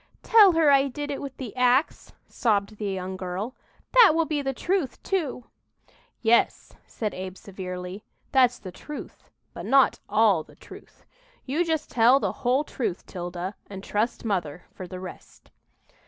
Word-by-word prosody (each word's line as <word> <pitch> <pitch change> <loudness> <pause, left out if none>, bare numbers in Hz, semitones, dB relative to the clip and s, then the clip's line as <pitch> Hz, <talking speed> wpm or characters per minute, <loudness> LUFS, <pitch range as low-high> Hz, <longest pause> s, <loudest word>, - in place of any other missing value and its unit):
"Tell 420 -5 +7
her 320 -3 +4
I 275 0 +5
did 290 +2 -5
it 280 - -4
with 275 -2 -7
the 250 -5 -7
ax," 250 +3 +1 0.2
sobbed 210 -2 0
the 205 -1 -3
young 190 -1 -4
girl. 185 +7 -5 0.4
"That 480 -9 +7
will 330 0 +2
be 305 -2 -1
the 270 -1 -1
truth, 340 -1 -1
too." 300 -10 -2 0.8
"Yes," 235 +1 +2 0.2
said 215 -2 -4
Abe 185 0 -7
severely, 185 0 -7 0.3
"that's 250 -2 +4
the 185 - -9
truth, 295 - -10 0.2
but - - -7
not 275 -1 +4
all 210 -6 +4
the - - -16
truth. - - -15 0.4
You 295 +6 0
just 320 -3 -2
tell 245 +3 +5
the - - -1
whole 255 +4 0
truth, 235 - -4
'Tilda, 175 +1 -5 0.2
and 195 -1 -8
trust 220 +4 -2
mother 180 -6 -2
for 185 - -8
the 185 0 -8
rest." 185 0 -12
235 Hz, 160 wpm, -25 LUFS, 190-280 Hz, 0.8 s, Tell